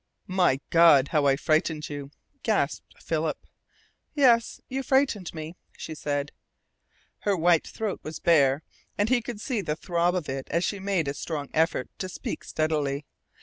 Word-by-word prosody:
"My 180 -8 +2
God, 165 -5 +6
how 150 -3 +2
I 135 - +4
frightened 155 +1 0
you!" 145 -1 -6 0.3
gasped - - -1
Philip. - - -2 0.8
"Yes, 240 -5 +4
you 265 +1 -2
frightened 265 -8 +1
me," 160 +1 -7 0.2
she 160 - -6
said. 145 -1 -2 0.9
Her 200 -2 0
white 170 -1 +3
throat 215 -3 -3
was 155 0 -6
bare, 145 -3 +3 0.3
and 205 +2 +1
he 250 -1 +3
could 230 -2 -6
see 230 0 -2
the 150 -5 -2
throb 175 +1 0
of 175 -5 -2
it 135 0 -4
as 170 +2 +1
she 200 +2 -1
made 190 -5 0
a 140 - -1
strong 145 0 -4
effort 160 -5 +1
to 185 - -3
speak - - -5
steadily. 150 -2 -1
165 Hz, 160 wpm, -27 LUFS, 145-195 Hz, 0.9 s, God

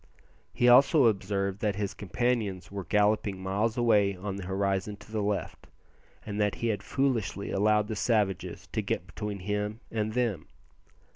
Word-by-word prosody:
He 120 - +2
also 135 +3 +7
observed 100 -2 0
that 105 -2 0
his 100 -1 -2
companions 105 -4 -2
were 100 -2 -5
galloping 105 0 +1
miles 100 +5 -1
away 105 -5 +3
on 95 +2 -5
the 95 -2 -6
horizon 100 +1 -1
to 105 - -16
the 110 -1 -1
left, 100 0 -3 0.6
and 105 0 -3
that 105 -1 +1
he 115 - -1
had 105 - -1
foolishly 115 -8 -1
allowed 105 +1 +2
the 110 - -3
savages 105 -5 0
to - - -1
get 85 - -2
between 100 +4 -5
him 105 +2 -2
and 110 -1 -1
them. 115 -9 -1
105 Hz, 160 wpm, -29 LUFS, 100-110 Hz, 0.6 s, also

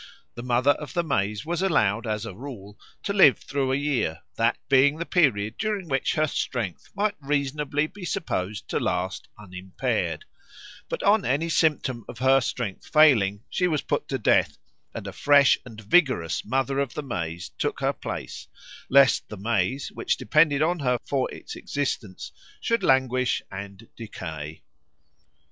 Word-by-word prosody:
The 120 - -7
Mother 125 +3 +3
of 145 -2 -5
the 175 - +2
maize 105 -6 -1
was 170 +2 -2
allowed, 115 - +1
as 105 0 -2
a 115 - -6
rule, 105 -3 -10 0.2
to 200 - -2
live 190 -9 +6
through 135 -2 -2
a - - +2
year, 135 - -1
that 115 +1 +1
being 140 +2 +4
the 170 - -3
period 115 - +1
during 210 -4 -2
which 135 -3 0
her 155 - +3
strength 120 - -3
might 205 +1 +1
reasonably 145 +1 -1
be 190 +5 -11
supposed 105 - -3
to - - 0
last 90 +1 -2
unimpaired; 95 -2 -3 0.6
but - - -3
on 205 0 +4
any 145 +6 0
symptom 145 -7 +1
of - - -8
her 130 +2 +4
strength 115 -4 -4
failing 110 -10 +4
she 180 - 0
was 155 -4 -1
put - - -2
to 135 - -2
death, 110 - +2 0.3
and - - -7
a - - -6
fresh 140 -2 +5
and 110 -3 -10
vigorous 125 - +2
Mother 135 +1 -1
of 140 -3 -2
the 150 - -3
Maize 85 - -4
took - - -1
her - - +1
place, - - -7 0.4
lest 140 -1 +5
the 105 - -7
maize 110 +5 -1
which - - -1
depended 150 -1 +3
on 170 +2 +1
her 125 -3 +1
for 135 -2 -1
its - - -9
existence 125 -9 -4 0.3
should 230 0 0
languish 130 -1 +2
and 100 +3 -8
decay. 80 -8 -7
130 Hz, 160 wpm, -25 LUFS, 105-150 Hz, 0.6 s, live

